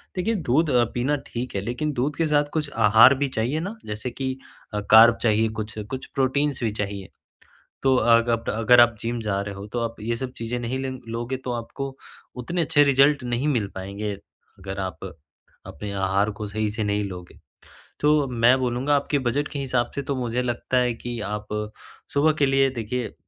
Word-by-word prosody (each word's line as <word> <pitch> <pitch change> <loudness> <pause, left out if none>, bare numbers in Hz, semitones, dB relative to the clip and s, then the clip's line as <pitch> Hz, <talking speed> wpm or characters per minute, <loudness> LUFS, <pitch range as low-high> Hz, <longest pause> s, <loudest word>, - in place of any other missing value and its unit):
देखिए 210 +5 0
दूध 160 - +1
अ, 125 -3 +4
पीना 130 +5 +1
ठीक 120 0 -5
है 100 - 0
लेकिन 125 +9 -2
दूध 140 +4 -1
के 165 - 0
साथ 150 -1 +3
कुछ 150 -2 -1 0.2
आहार 110 +5 +8
भी 140 +1 0
चाहिए 125 +8 0
ना, 195 +7 -5
जैसे 105 +4 -5
कि 130 +1 -3 0.5
कार्ब 115 +1 +8
चाहिए 110 -1 +3
कुछ, 110 0 -6
कुछ 115 +5 -6
प्रोटीन्स 140 0 0
भी 110 - +1
चाहिए। 100 -2 -5 0.7
तो 135 -1 +4
अग 115 -1 +4
आप 115 -1 -1
अगर 115 +3 +5
आप 120 -2 +5
जिम 120 +1 -2
जा 100 -2 -1
रहे 100 0 -6
हो 100 +1 -8
तो - - 0
आप 115 0 -3
ये 115 +2 -2
सब 125 +1 -5
चीज़ें 115 +1 -3
नहीं 120 +2 -3
लेंग 130 -1 -4
लोगे 120 +3 -3
तो 125 - -2
आपको 135 +3 -5 0.5
उतने 170 +8 -2
अच्छे 145 -1 +4
रिज़ल्ट 140 0 +4
नहीं 120 +3 -1
मिल 120 -8 +1
पाएँगे। 100 +2 -4
अगर 100 0 -11
आप 95 -2 -5 0.6
अपने 100 +6 -7
आहार 100 +1 +1
को 105 - -3
सही 110 +1 -2
से 110 +1 -3
नहीं 105 0 0
लोगे। 90 -3 -8 0.6
तो 150 -1 +3
मैं 125 +1 +4
बोलूँगा 130 +3 0
आपके 145 +1 +1
बजट 145 +4 -1
के 145 - -6
हिसाब 125 -3 -1
से 140 - -2
तो 140 0 -3
मुझे 125 -1 -1
लगता 120 +1 -2
है 125 -1 +1
कि 120 +1 -6
आप 105 0 -4 0.7
सुबह 150 +2 +4
के 140 - +4
लिए 135 0 +3
देखिए 115 +2 -4
120 Hz, 195 wpm, -24 LUFS, 110-135 Hz, 0.7 s, आहार